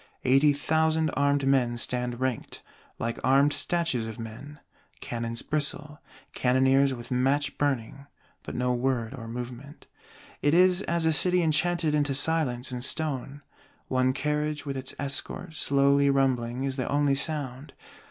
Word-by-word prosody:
Eighty 135 Hz, +3 st, +5 dB
thousand 160 Hz, +2 st, +1 dB
armed 140 Hz, -1 st, +1 dB
men 125 Hz, -3 st, +2 dB
stand 125 Hz, 0 st, -3 dB
ranked, 130 Hz, -3 st, -3 dB, 0.3 s
like 115 Hz, 0 st, -3 dB
armed 140 Hz, +3 st, +4 dB
statues 165 Hz, -10 st, 0 dB
of 110 Hz, -, -7 dB
men; 115 Hz, +6 st, -9 dB, 0.4 s
cannons 115 Hz, -1 st, -4 dB
bristle, 150 Hz, 0 st, -2 dB, 0.3 s
cannoneers 130 Hz, +2 st, +3 dB
with 120 Hz, -1 st, -7 dB
match 135 Hz, +3 st, +1 dB
burning, 140 Hz, -1 st, -2 dB, 0.3 s
but -, -, -8 dB
no 125 Hz, 0 st, 0 dB
word 125 Hz, -1 st, -1 dB
or 115 Hz, -4 st, -8 dB
movement: 125 Hz, +4 st, -8 dB, 0.6 s
it 145 Hz, +2 st, +3 dB
is 180 Hz, +1 st, +5 dB
as 170 Hz, -1 st, 0 dB
a 160 Hz, -, +3 dB
city 180 Hz, +3 st, +4 dB
enchanted 160 Hz, 0 st, +1 dB
into 145 Hz, -2 st, +1 dB
silence 140 Hz, -5 st, +1 dB
and 125 Hz, -1 st, -4 dB
stone: 145 Hz, -1 st, -3 dB, 0.5 s
one 130 Hz, 0 st, +2 dB
carriage 150 Hz, +1 st, -2 dB
with 140 Hz, -1 st, -4 dB
its 130 Hz, 0 st, -5 dB
escort, 145 Hz, +4 st, -4 dB
slowly 140 Hz, -1 st, +3 dB
rumbling, 130 Hz, -2 st, 0 dB
is 135 Hz, 0 st, -2 dB
the 130 Hz, -, -2 dB
only 145 Hz, -1 st, +2 dB
sound. 140 Hz, -1 st, -2 dB
140 Hz, 140 wpm, -27 LUFS, 125-150 Hz, 0.6 s, Eighty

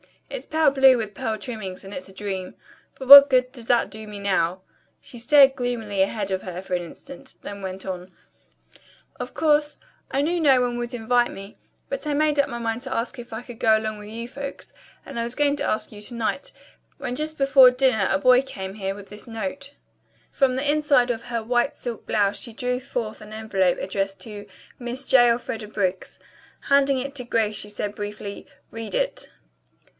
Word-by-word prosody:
It's -, -, -6 dB
pale 315 Hz, -2 st, +3 dB
blue 265 Hz, -2 st, +6 dB
with 215 Hz, -3 st, -4 dB
pearl 220 Hz, +2 st, -3 dB
trimmings 210 Hz, -5 st, -6 dB
and 195 Hz, +1 st, -10 dB
it's 275 Hz, -, -7 dB
a -, -, -14 dB
dream. 190 Hz, -2 st, -5 dB, 0.4 s
But 265 Hz, -1 st, -8 dB
what 280 Hz, 0 st, +12 dB
good 255 Hz, -1 st, +2 dB
does 240 Hz, -4 st, -12 dB
it 240 Hz, -1 st, +3 dB
do 215 Hz, 0 st, -8 dB
me 210 Hz, -1 st, -8 dB
now?" 190 Hz, -2 st, 0 dB, 0.4 s
She 240 Hz, -, -11 dB
stared 270 Hz, +2 st, +6 dB
gloomily 225 Hz, -5 st, -2 dB
ahead 200 Hz, 0 st, -1 dB
of 190 Hz, 0 st, -1 dB
her 180 Hz, -1 st, -6 dB
for 190 Hz, -1 st, -7 dB
an 180 Hz, -, +1 dB
instant, 275 Hz, +10 st, -12 dB
then 200 Hz, 0 st, -8 dB
went 190 Hz, 0 st, -6 dB
on: 185 Hz, -1 st, -6 dB, 1.1 s
"Of -, -, -6 dB
course, 300 Hz, -1 st, +2 dB, 0.3 s
I 275 Hz, -, 0 dB
knew 340 Hz, +4 st, 0 dB
no 275 Hz, -5 st, +5 dB
one 245 Hz, -1 st, -1 dB
would 240 Hz, +1 st, -4 dB
invite 240 Hz, +1 st, +1 dB
me, 195 Hz, +2 st, -10 dB, 0.3 s
but -, -, -4 dB
I 295 Hz, -, 0 dB
made 300 Hz, 0 st, +2 dB
up 280 Hz, -, +3 dB
my 235 Hz, -, -5 dB
mind 230 Hz, 0 st, -3 dB
to 260 Hz, -, -4 dB
ask 235 Hz, +2 st, -3 dB
if 240 Hz, -1 st, -9 dB
I 220 Hz, -, -4 dB
could 245 Hz, -2 st, -11 dB
go 220 Hz, -1 st, +4 dB
along 215 Hz, -1 st, -4 dB
with 210 Hz, -, -10 dB
you 230 Hz, +2 st, -6 dB
folks, 280 Hz, +2 st, -8 dB, 0.3 s
and -, -, -6 dB
I -, -, 0 dB
was 235 Hz, +1 st, -4 dB
going 290 Hz, -1 st, +2 dB
to -, -, -2 dB
ask 215 Hz, -, -1 dB
you 210 Hz, -1 st, -11 dB
to 225 Hz, +4 st, -3 dB
night, 235 Hz, +4 st, -2 dB, 0.5 s
when 245 Hz, -, -4 dB
just 310 Hz, +4 st, -2 dB
before 275 Hz, -2 st, +7 dB
dinner 250 Hz, -6 st, +2 dB
a 195 Hz, -, +2 dB
boy 250 Hz, +5 st, +5 dB
came 190 Hz, -7 st, -7 dB
here 195 Hz, -2 st, -3 dB
with 200 Hz, -1 st, -12 dB
this 210 Hz, +4 st, -8 dB
note." 230 Hz, +6 st, -6 dB, 0.6 s
From 265 Hz, -2 st, +2 dB
the 270 Hz, +2 st, -2 dB
inside 290 Hz, -4 st, +3 dB
of 230 Hz, -1 st, -4 dB
her 235 Hz, -2 st, -3 dB
white 240 Hz, +1 st, +1 dB
silk 235 Hz, -2 st, -7 dB
blouse 205 Hz, -1 st, +1 dB
she 235 Hz, -, -5 dB
drew 250 Hz, +2 st, -2 dB
forth 245 Hz, -4 st, -5 dB
an 210 Hz, 0 st, -11 dB
envelope 195 Hz, -5 st, 0 dB
addressed 195 Hz, 0 st, -3 dB
to 205 Hz, -1 st, -8 dB, 0.3 s
"Miss 245 Hz, +2 st, -4 dB
J. 245 Hz, -3 st, +5 dB
Elfreda 230 Hz, -2 st, -2 dB
Briggs." 190 Hz, -3 st, -3 dB, 0.5 s
Handing 280 Hz, -1 st, +4 dB
it 275 Hz, +2 st, -4 dB
to 255 Hz, -, -1 dB
Grace 220 Hz, -3 st, 0 dB
she 210 Hz, -, 0 dB
said 205 Hz, 0 st, -4 dB
briefly: 205 Hz, -1 st, -7 dB, 0.2 s
"Read 225 Hz, -1 st, -5 dB
it." -, -, -2 dB
235 Hz, 205 wpm, -24 LUFS, 205-265 Hz, 1.1 s, what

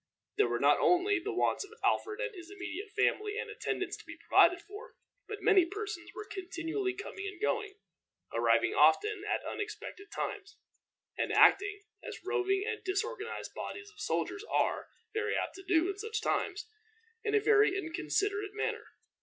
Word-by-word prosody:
There 420 Hz, -, +4 dB
were -, -, -1 dB
not -, -, +5 dB
only 365 Hz, +2 st, +4 dB
the 405 Hz, +5 st, -3 dB
wants 380 Hz, -, +1 dB
of 410 Hz, +3 st, -13 dB
Alfred 430 Hz, +1 st, +1 dB
and -, -, -2 dB
his 350 Hz, -3 st, -10 dB
immediate 400 Hz, +1 st, -6 dB
family 420 Hz, +1 st, +1 dB
and -, -, -3 dB
attendants -, -, -2 dB
to -, -, -13 dB
be -, -, -10 dB
provided 355 Hz, +1 st, +5 dB
for, 415 Hz, +7 st, -11 dB, 0.3 s
but 420 Hz, -3 st, -6 dB
many 405 Hz, -4 st, +6 dB
persons 400 Hz, -1 st, -5 dB
were 425 Hz, -, -6 dB
continually 375 Hz, 0 st, -3 dB
coming 400 Hz, 0 st, -6 dB
and 385 Hz, -2 st, -7 dB
going, 425 Hz, -1 st, -1 dB, 0.6 s
arriving -, -, +3 dB
often 420 Hz, -2 st, +4 dB
at -, -, 0 dB
unexpected 410 Hz, -1 st, -6 dB
times, 405 Hz, -1 st, -4 dB, 0.6 s
and -, -, 0 dB
acting, 410 Hz, +1 st, +5 dB, 0.2 s
as 455 Hz, -7 st, -8 dB
roving 390 Hz, +1 st, +1 dB
and 445 Hz, -1 st, -3 dB
disorganized 425 Hz, +4 st, -3 dB
bodies 410 Hz, +1 st, -6 dB
of 425 Hz, -, -20 dB
soldiers 405 Hz, -, -1 dB
are -, -, +1 dB, 0.2 s
very 435 Hz, 0 st, 0 dB
apt -, -, -2 dB
to 385 Hz, -, -10 dB
do 350 Hz, -2 st, +3 dB
at 395 Hz, -, -10 dB
such 440 Hz, +1 st, -2 dB
times, 415 Hz, -1 st, -1 dB, 0.6 s
in 430 Hz, -1 st, +1 dB
a -, -, +6 dB
very 420 Hz, -2 st, +4 dB
inconsiderate 405 Hz, +4 st, -1 dB
manner. 425 Hz, -, -2 dB
410 Hz, 165 wpm, -32 LUFS, 380-425 Hz, 0.6 s, many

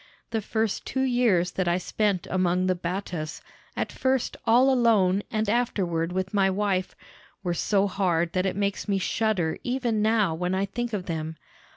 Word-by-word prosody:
The 225 Hz, -1 st, 0 dB
first 220 Hz, 0 st, -1 dB
two 265 Hz, +1 st, -1 dB
years 235 Hz, -9 st, +2 dB
that 185 Hz, -2 st, -2 dB
I 175 Hz, +1 st, +2 dB
spent 195 Hz, 0 st, 0 dB
among 185 Hz, 0 st, +1 dB
the 185 Hz, -, +3 dB
Battas, 175 Hz, -3 st, -4 dB, 0.4 s
at -, -, -1 dB
first 260 Hz, -1 st, 0 dB
all 255 Hz, +4 st, +5 dB
alone 205 Hz, -6 st, +3 dB
and 215 Hz, 0 st, -1 dB
afterward 185 Hz, -7 st, 0 dB
with 185 Hz, +2 st, -2 dB
my 195 Hz, -1 st, +3 dB
wife, 190 Hz, -1 st, -1 dB, 0.5 s
were 175 Hz, -2 st, 0 dB
so 195 Hz, +3 st, +2 dB
hard 175 Hz, -4 st, 0 dB
that 185 Hz, +1 st, +1 dB
it 190 Hz, -, -2 dB
makes 200 Hz, +1 st, -1 dB
me 200 Hz, -1 st, +1 dB
shudder 190 Hz, -4 st, 0 dB
even 245 Hz, -4 st, 0 dB
now 215 Hz, -5 st, +2 dB
when 180 Hz, +3 st, -1 dB
I 195 Hz, +1 st, +1 dB
think 240 Hz, +3 st, -4 dB
of 190 Hz, -3 st, -2 dB
them. 160 Hz, -1 st, -4 dB
195 Hz, 175 wpm, -26 LUFS, 180-220 Hz, 0.5 s, all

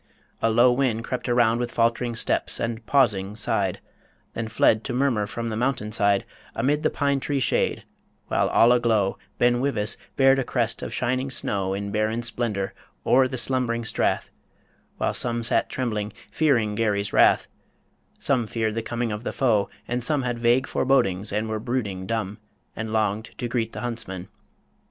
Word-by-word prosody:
A 115 Hz, -, +3 dB
low 120 Hz, +3 st, +5 dB
wind 120 Hz, -3 st, 0 dB
crept 125 Hz, +1 st, -4 dB
Around 120 Hz, -1 st, +3 dB
with 120 Hz, -1 st, -2 dB
falt'ring 115 Hz, +1 st, +1 dB
steps, -, -, +1 dB
and, 115 Hz, 0 st, -3 dB
pausing, 105 Hz, -8 st, +2 dB
sighed 100 Hz, -3 st, 0 dB, 0.5 s
Then 115 Hz, -1 st, -3 dB
fled 110 Hz, 0 st, +3 dB
to 125 Hz, -, -2 dB
murmur 125 Hz, -5 st, +1 dB
from 115 Hz, +2 st, -4 dB
the 110 Hz, -, -3 dB
mountain 120 Hz, -3 st, -1 dB
side 100 Hz, -2 st, +2 dB, 0.3 s
Amid 145 Hz, +6 st, +1 dB
the -, -, +2 dB
pine 140 Hz, -1 st, 0 dB
tree 140 Hz, +1 st, -1 dB
shade; 130 Hz, -, 0 dB, 0.4 s
while -, -, +1 dB
all 115 Hz, -, +5 dB
aglow 115 Hz, -5 st, +2 dB, 0.2 s
Ben 120 Hz, 0 st, +3 dB
Wyvis 115 Hz, -6 st, 0 dB, 0.2 s
bared 135 Hz, 0 st, +5 dB
a -, -, +1 dB
crest 120 Hz, -2 st, -1 dB
of -, -, -5 dB
shining 130 Hz, +2 st, -1 dB
snow 100 Hz, -6 st, 0 dB
In 100 Hz, 0 st, -4 dB
barren 110 Hz, +2 st, 0 dB
splendour 110 Hz, -4 st, -2 dB, 0.3 s
o'er 130 Hz, +1 st, +5 dB
the 130 Hz, -, -5 dB
slumbering 120 Hz, -2 st, -1 dB
strath; -, -, 0 dB, 0.7 s
While -, -, 0 dB
some 120 Hz, -1 st, 0 dB
sat -, -, +1 dB
trembling, 105 Hz, -5 st, -3 dB, 0.2 s
fearing 120 Hz, -9 st, +2 dB
Garry's 105 Hz, -2 st, 0 dB
wrath, -, -, +4 dB, 0.7 s
Some 125 Hz, -5 st, 0 dB
feared 110 Hz, -1 st, -1 dB
the 115 Hz, -, -2 dB
coming 120 Hz, 0 st, -3 dB
of 105 Hz, +2 st, -5 dB
the -, -, -2 dB
foe, 110 Hz, -7 st, +1 dB, 0.2 s
and 120 Hz, 0 st, -2 dB
some 145 Hz, 0 st, +1 dB
Had 120 Hz, -1 st, -2 dB
vague 120 Hz, +2 st, +3 dB
forebodings, 105 Hz, -10 st, +1 dB
and 105 Hz, +2 st, -1 dB
were 110 Hz, 0 st, -2 dB
brooding 105 Hz, -6 st, -3 dB
dumb, 105 Hz, -2 st, -3 dB, 0.4 s
And 110 Hz, 0 st, -4 dB
longed 110 Hz, 0 st, -1 dB
to 120 Hz, -, -3 dB
greet 115 Hz, -2 st, -2 dB
the 105 Hz, -, -6 dB
huntsmen. 105 Hz, -6 st, -4 dB
115 Hz, 170 wpm, -24 LUFS, 105-125 Hz, 0.7 s, low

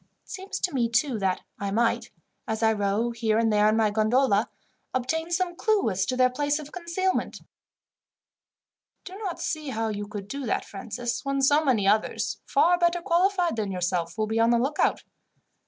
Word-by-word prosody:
It -, -, -26 dB
seems 385 Hz, 0 st, -5 dB
to 360 Hz, -, -1 dB
me, 240 Hz, -3 st, +1 dB
too, 235 Hz, +1 st, +1 dB
that 190 Hz, -2 st, 0 dB, 0.2 s
I 200 Hz, -, -2 dB
might, 235 Hz, +3 st, 0 dB, 0.4 s
as 220 Hz, +1 st, -2 dB
I 220 Hz, 0 st, +4 dB
row 205 Hz, +3 st, 0 dB
here 225 Hz, -2 st, 0 dB
and 225 Hz, -1 st, +2 dB
there 210 Hz, 0 st, +4 dB
in 215 Hz, -, +2 dB
my 220 Hz, -2 st, +2 dB
gondola, 215 Hz, +1 st, +2 dB, 0.5 s
obtain 320 Hz, +6 st, -1 dB
some 350 Hz, 0 st, -1 dB
clue 415 Hz, -, +1 dB
as 190 Hz, 0 st, -1 dB
to 255 Hz, -, -1 dB
their 255 Hz, 0 st, +4 dB
place 290 Hz, +3 st, 0 dB
of 300 Hz, -1 st, -8 dB
concealment." 360 Hz, +2 st, -2 dB
"I -, -, -21 dB, 1.6 s
do 375 Hz, -, -8 dB
not 395 Hz, -5 st, -5 dB
see 310 Hz, -3 st, -3 dB
how 225 Hz, -2 st, -2 dB
you 205 Hz, -1 st, -4 dB
could 205 Hz, -2 st, -7 dB
do 275 Hz, +3 st, -5 dB
that, -, -, -1 dB
Francis, 235 Hz, +4 st, -5 dB
when 275 Hz, 0 st, -1 dB
so 290 Hz, +3 st, +4 dB
many 235 Hz, -9 st, +2 dB
others, 215 Hz, +2 st, 0 dB
far 350 Hz, +1 st, +3 dB
better 345 Hz, 0 st, +2 dB
qualified 355 Hz, -, +1 dB
than 205 Hz, -3 st, -2 dB
yourself, 175 Hz, -2 st, -2 dB
will 215 Hz, -, +1 dB
be 220 Hz, +1 st, -1 dB
on 230 Hz, 0 st, +4 dB
the 235 Hz, -, +4 dB
lookout. 270 Hz, +6 st, 0 dB
240 Hz, 190 wpm, -26 LUFS, 215-315 Hz, 1.6 s, I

